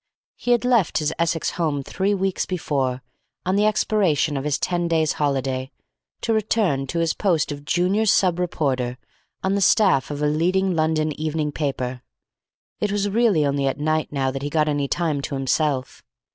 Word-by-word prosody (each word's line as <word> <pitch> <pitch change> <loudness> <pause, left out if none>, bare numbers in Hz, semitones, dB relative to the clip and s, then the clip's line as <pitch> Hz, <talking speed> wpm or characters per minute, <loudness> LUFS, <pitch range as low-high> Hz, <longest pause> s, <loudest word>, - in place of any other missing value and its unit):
He - - -6
had 240 0 +3
left 235 -8 +2
his 155 0 0
Essex 165 -1 0
home 150 -5 -1
three 195 +8 0
weeks 190 -1 -1
before, 135 -8 -2 0.4
on 185 +1 +1
the 210 +1 +3
expiration 185 -9 +1
of 135 +1 -3
his 150 -1 +1
ten 175 -1 -1
days' 160 -2 +1
holiday, 135 -2 -1 0.5
to 230 - 0
return 205 -10 +1
to 170 - -4
his 165 -1 +1
post 170 -7 0
of 145 0 -7
junior 185 +7 +1
sub 180 -3 +3
reporter 130 -8 -1 0.5
on 190 +1 +1
the 200 - 0
staff 190 - +4
of 145 0 -4
a - - +3
leading 180 +5 +1
London 155 -1 +1
evening 155 -1 -1
paper. 130 -4 -3 0.8
It 210 - -1
was 205 0 0
really 205 -8 +3
only 140 -1 0
at 135 - -2
night 155 +1 0
now 135 -2 0
that 135 0 -5
he 145 - -3
got 155 0 +1
any 145 -2 0
time 155 -2 -1
to 140 - -4
himself. 135 0 -1
155 Hz, 180 wpm, -22 LUFS, 140-190 Hz, 0.8 s, staff